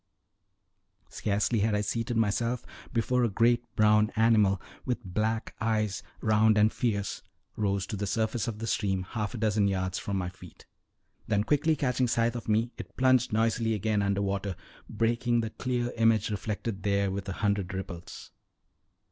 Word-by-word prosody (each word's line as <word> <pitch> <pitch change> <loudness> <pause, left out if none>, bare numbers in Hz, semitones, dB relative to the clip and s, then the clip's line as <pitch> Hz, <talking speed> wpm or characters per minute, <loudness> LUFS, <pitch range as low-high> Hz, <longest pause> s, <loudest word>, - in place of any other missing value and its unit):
Scarcely 105 +2 0
had 105 +1 +2
I 105 - +1
seated 115 +3 -2
myself 115 +3 0 0.3
before 125 +2 +1
a 120 - +2
great 120 +3 +3
brown 105 0 +4
animal, 110 -4 +4 0.2
with 125 -1 -2
black 110 +4 -1
eyes, 110 -3 0 0.2
round 110 0 +4
and 105 +1 +4
fierce, 100 -5 -1 0.3
rose 100 -3 0
to 105 - -5
the 100 0 -3
surface 110 +1 -1
of 115 -3 -3
the 115 - -4
stream 95 -4 0
half 105 +4 -4
a - - -4
dozen 105 -2 +2
yards 95 -1 -1
from 100 -1 -3
my 90 -1 -2
feet; 90 - -14 0.6
then 105 0 +2
quickly 150 +5 +2
catching 130 -3 +1
sight 115 0 +1
of 120 - -5
me, 110 +3 +2
it - - -9
plunged 130 -2 +3
noisily 115 +1 +1
again 105 0 0
under 100 0 0
water, 100 -1 -2 0.3
breaking 115 +2 +1
the 110 -1 -4
clear 120 0 -2
image 115 -2 +3
reflected 105 0 -3
there 100 0 +1
with 100 0 -4
a - - -2
hundred 100 -2 0
ripples. 95 -3 -7
110 Hz, 165 wpm, -29 LUFS, 100-115 Hz, 0.6 s, brown